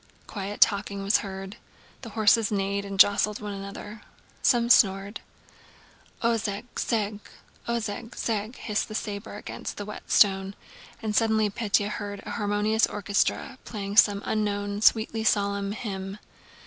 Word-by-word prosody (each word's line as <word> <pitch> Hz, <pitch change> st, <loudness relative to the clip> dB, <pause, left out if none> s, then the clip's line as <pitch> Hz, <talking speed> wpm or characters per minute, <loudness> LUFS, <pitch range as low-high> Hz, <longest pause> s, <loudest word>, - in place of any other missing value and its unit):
Quiet 200 Hz, 0 st, -6 dB
talking 200 Hz, -1 st, +3 dB
was 200 Hz, +2 st, +4 dB
heard. 195 Hz, +1 st, -7 dB, 0.4 s
The 235 Hz, -, -8 dB
horses 220 Hz, 0 st, +4 dB
neighed 200 Hz, 0 st, -1 dB
and 195 Hz, -1 st, -6 dB
jostled 205 Hz, +1 st, +5 dB
one 210 Hz, -1 st, -5 dB
another. 200 Hz, +2 st, -8 dB, 0.4 s
Someone 240 Hz, -2 st, +3 dB
snored. 195 Hz, -1 st, +4 dB, 1.0 s
"Ozheg 225 Hz, -2 st, 0 dB
zheg, 210 Hz, -2 st, -1 dB, 0.5 s
Ozheg 225 Hz, -2 st, -3 dB
zheg..." 220 Hz, +1 st, -2 dB
hissed 210 Hz, -2 st, -2 dB
the 215 Hz, -, -7 dB
saber 205 Hz, 0 st, -5 dB
against 205 Hz, -, -7 dB
the 205 Hz, -, -5 dB
whetstone, 195 Hz, -2 st, +2 dB, 0.5 s
and 215 Hz, -1 st, -2 dB
suddenly 220 Hz, -2 st, +3 dB
Pétya 205 Hz, -2 st, +1 dB
heard 205 Hz, -1 st, -5 dB
an -, -, -6 dB
harmonious 210 Hz, +1 st, +1 dB
orchestra 210 Hz, +6 st, -1 dB
playing 200 Hz, -2 st, -5 dB
some 205 Hz, -2 st, +5 dB
unknown, 205 Hz, -1 st, -1 dB
sweetly 220 Hz, 0 st, +3 dB
solemn 200 Hz, -2 st, +1 dB
hymn. 195 Hz, -2 st, -5 dB
205 Hz, 130 wpm, -26 LUFS, 200-220 Hz, 1.0 s, jostled